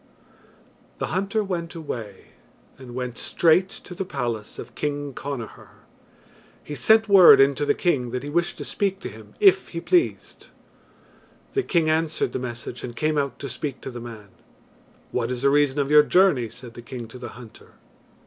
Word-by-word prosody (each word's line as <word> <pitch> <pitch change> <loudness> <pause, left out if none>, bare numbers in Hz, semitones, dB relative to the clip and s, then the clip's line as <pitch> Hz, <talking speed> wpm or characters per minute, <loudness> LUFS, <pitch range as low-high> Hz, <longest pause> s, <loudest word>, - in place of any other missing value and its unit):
The - - -4
hunter 200 +3 0
went 175 -4 -4
away, 115 - -7 0.5
and 125 -2 -10
went 125 -2 -4
straight 175 +3 +3
to 185 - -11
the 190 - -3
palace 120 - -4
of 120 0 -9
King 145 0 -3
Connachar. 135 -5 -8 0.8
He 150 - -7
sent 220 - +4
word 195 -4 +9
in 135 +1 +5
to 145 +2 -3
the - - +3
king 135 -9 0
that 125 +2 -4
he 145 - -5
wished 170 +2 0
to - - -6
speak 195 -1 -1
to - - -5
him - - -14
if 390 -2 +5
he 170 - -5
pleased. 350 - 0 1.1
The 400 - +2
king 170 - +1
answered 160 0 0
the - - -2
message 120 0 -6
and 120 -2 -6
came 155 +2 0
out 140 -1 -2
to 140 - -6
speak 135 +2 -5
to 135 - -6
the 120 -1 -8
man. 110 -4 -10 0.8
"What 120 -1 -1
is 125 0 -4
the 140 - +4
reason 145 -1 +2
of 140 0 0
your 150 0 +9
journey?" 150 -8 +3
said 120 +1 -12
the 120 - -10
king 120 -1 -8
to 125 - -11
the - - -7
hunter. 120 -3 -14
140 Hz, 185 wpm, -24 LUFS, 120-170 Hz, 1.1 s, word